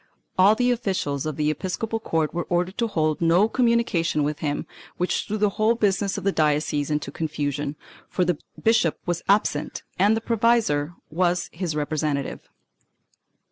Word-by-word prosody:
All 195 +3 +6
the 245 +1 +2
officials 185 - -1
of 155 - -3
the 150 +1 +1
episcopal 215 +7 -3
court 160 -7 -1
were 175 -1 -2
ordered 180 +2 0
to 230 - +2
hold 155 -6 0
no 170 +5 +4
communication 230 - +1
with 150 +1 -2
him, 145 -2 -2 0.3
which 180 - -1
threw 215 - -2
the 210 -1 +2
whole 225 +2 +4
business 200 -3 +1
of - - -5
the 195 - +2
diocese 150 -2 +1
into 150 -2 -2
confusion, 145 -2 -3 0.3
for 180 - +1
the 175 -3 0 0.2
bishop 220 -8 +2
was 175 -1 -1
absent 195 -7 +1 0.2
and 205 +4 +4
the - - 0
provisor 220 -10 +1 0.2
was 175 +1 0
his 165 -2 -3
representative. 150 -1 -2
175 Hz, 160 wpm, -24 LUFS, 150-210 Hz, 0.3 s, All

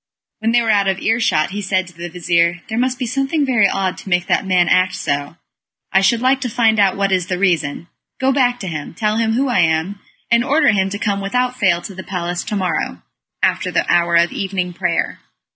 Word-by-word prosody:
When 225 +1 0
they 240 0 +3
were 225 - +1
out 200 -2 +2
of 190 -1 0
earshot, 220 -9 +1
he 205 +1 -4
said 185 -1 0
to 175 - -14
the 170 +1 -7
vizir, 170 0 0
"There 220 -2 -4
must 255 0 0
be 255 - -3
something 275 +5 0
very 240 -6 +3
odd 190 -1 -2
to - - -10
make 180 -1 +1
that 195 - 0
man 180 -2 +3
act 185 0 +2
so 145 +3 -3 0.6
I 195 - +5
should 225 +4 +2
like 260 +1 +2
to 250 - -2
find 225 -2 +2
out 195 -2 +3
what 195 0 0
is 185 -2 +1
the 185 -2 -2
reason. 170 -4 0 0.3
Go 265 +1 +2
back 245 -2 +1
to 195 - -5
him; 155 -2 -6
tell 215 +2 0
him 225 -1 +1
who 265 +4 +1
I 245 -6 +1
am, 165 +4 +1 0.3
and 235 0 +4
order 290 +2 +3
him 195 -2 +1
to 200 - -4
come 200 -1 -1
without 250 +5 -1
fail 175 -5 +2
to 195 - -7
the 190 - -8
palace 175 -2 -4
to 210 - -3
morrow, 170 - -2 0.4
after - - +1
the - - 0
hour 170 0 +2
of 170 0 +4
evening 185 -2 -3
prayer." - - -1
195 Hz, 230 wpm, -18 LUFS, 175-230 Hz, 0.6 s, I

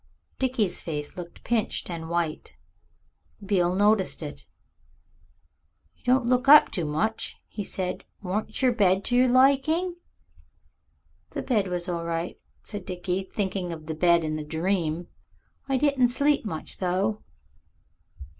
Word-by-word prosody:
Dickie's 245 -8 0
face 150 -3 -5
looked 175 -1 -9
pinched 230 -3 -1
and 165 -2 -6
white. 170 -2 -2 0.9
Beale 180 -3 +2
noticed 205 -1 +2
it. - - -8 1.5
"You - - -34
don't 255 0 +3
look 250 +2 +2
up 300 +2 +9
to 175 -6 -2
much," 185 +10 -2
he 210 - -5
said; 185 -1 -4 0.2
"warn't 215 +6 -2
your 255 - +5
bed 195 -4 +3
to 245 - +1
your 250 +1 +5
liking?" 280 +8 +3 1.3
"The - - -5
bed 215 -7 +1
was 180 0 -3
all 170 -2 -2
right," 165 +1 -3 0.2
said 205 -3 -6
Dickie, 180 +1 -3
thinking 190 -3 -2
of 160 -2 -7
the 160 - -3
bed 170 +1 +3
in 155 0 -2
the 155 - -4
dream. 165 +1 -1 0.6
"I 270 - +2
diden 275 -2 +3
sleep 280 +2 +1
much, 160 -7 -5
though." 195 +4 0
190 Hz, 135 wpm, -26 LUFS, 170-245 Hz, 1.5 s, up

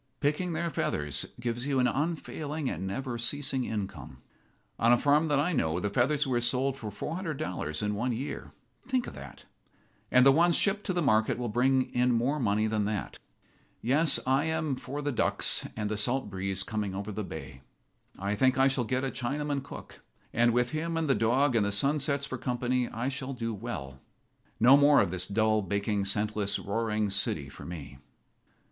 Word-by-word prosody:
Picking 155 +5 0
their 170 +1 -2
feathers 75 - -1
gives 120 +2 -3
you 140 -2 +1
an 125 - +3
unfailing 155 0 -2
and 95 - -4
never 120 +4 -4
ceasing 130 +1 -2
income. 100 -3 -5 0.6
On 115 +1 +4
a 120 - +6
farm 145 +5 +3
that 145 -2 +2
I 175 +5 +1
know 80 - 0
the 105 +1 -2
feathers 140 +7 +2
were 125 -3 0
sold 130 +3 0
for 115 -6 -6
$400 150 - -4
in 105 0 0
one 120 +5 -1
year. 125 +5 -5 0.4
Think 255 -2 0
of - - -8
that! - - -11 0.6
And 125 0 +5
the 135 - +8
ones 170 +4 +4
shipped 205 +1 +2
to 185 - 0
the 175 -1 0
market 110 -5 +2
will 120 -1 -3
bring 130 +3 +2
in 125 0 +3
more 130 +6 +1
money 110 -3 +1
than 110 -1 0
that. 105 -1 -3 0.6
Yes, 140 +6 +4
I 135 +3 +2
am 160 -3 -1
for 145 +3 -6
the 145 - 0
ducks 120 - +2
and 105 -1 -1
the 105 0 -2
salt 120 +1 +2
breeze 95 0 -2
coming 105 -3 -3
over 100 +2 -4
the 105 +1 -4
bay. 80 -7 -8 0.6
I 100 +2 -2
think 130 +5 +2
I 135 0 +5
shall 130 -3 0
get 130 +3 -1
a 135 - -1
Chinaman 140 +3 -2
cook, 140 - -11 0.3
and 120 +1 +4
with 120 +1 +1
him 165 +2 -2
and 165 -1 0
the 135 - +4
dog 125 +3 +2
and 110 - +4
the 100 - 0
sunsets 140 +5 +1
for 130 -2 -6
company 125 0 -1
I 115 +3 -3
shall 135 0 -3
do 115 -2 -3
well. 80 - -6 0.6
No 125 +4 +8
more 145 0 +6
of - - +2
this 90 0 -3
dull, 110 +1 +2
baking, 100 +1 -1
senseless, 105 0 0
roaring 105 0 -1
city 80 -8 -1
for - - -11
me." 70 -6 -8
125 Hz, 190 wpm, -29 LUFS, 105-140 Hz, 0.6 s, the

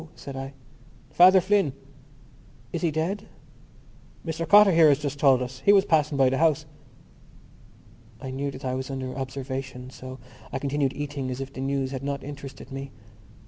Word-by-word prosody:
said 140 - -9
I. 135 +1 -6 0.6
"Father 185 +2 +7
Flynn." 195 -6 +2 1.0
"Is 170 - -2
he 170 - +2
dead?" 180 +7 -2 1.0
"Mr 165 0 -3
Cotter 205 -1 +8
here 165 -2 +6
has 140 - +4
just 145 -1 -4
told 135 -3 +4
us. 125 +1 -7
He 200 - +6
was 200 -1 +5
passing 150 -5 +2
by 135 -1 +5
the 135 - 0
house." 155 -1 +2 1.5
I 130 - -6
knew 140 +2 -3
that 135 -1 -9
I 130 - -1
was 130 +1 -4
under 130 -1 -5
observation 130 -1 -5
so 130 0 -9 0.3
I - - -2
continued 140 0 -1
eating 140 -2 -4
as 130 0 -4
if 135 0 -6
the 130 - -6
news 135 -1 -1
had 135 -2 -4
not 140 0 -4
interested 140 -1 -9
me. 135 0 -6
140 Hz, 175 wpm, -26 LUFS, 130-160 Hz, 1.5 s, Cotter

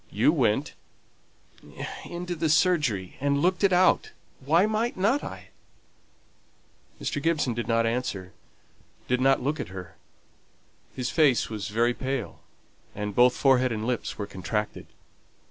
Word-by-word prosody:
You - - +3
went - - +1 0.7
" - - -10
"Into 175 0 -4
the 165 -1 -1
surgery, 150 - +1
and 140 0 +2
looked 180 +5 +1
it 195 - +5
out. 180 +1 +3 0.3
Why 160 +8 +3
might 220 +2 -1
not 225 +10 +2
I?" - - -8 1.5
Mr. 145 - -3
Gibson 150 -6 +1
did 120 +1 -4
not 115 0 +2
answer 115 -6 -3 0.7
did 125 0 +1
not 135 0 +3
look 150 +3 -1
at - - -4
her. 90 -3 -9 1.0
His 125 -1 -2
face 145 -8 +3
was 105 -2 -4
very 115 +3 +1
pale, 130 -3 -4 0.6
and 105 0 -4
both 125 +3 +4
forehead 130 -2 +3
and 110 -1 -3
lips 125 -1 -2
were 105 - -3
contracted. 100 +2 -4
130 Hz, 140 wpm, -26 LUFS, 115-165 Hz, 1.5 s, it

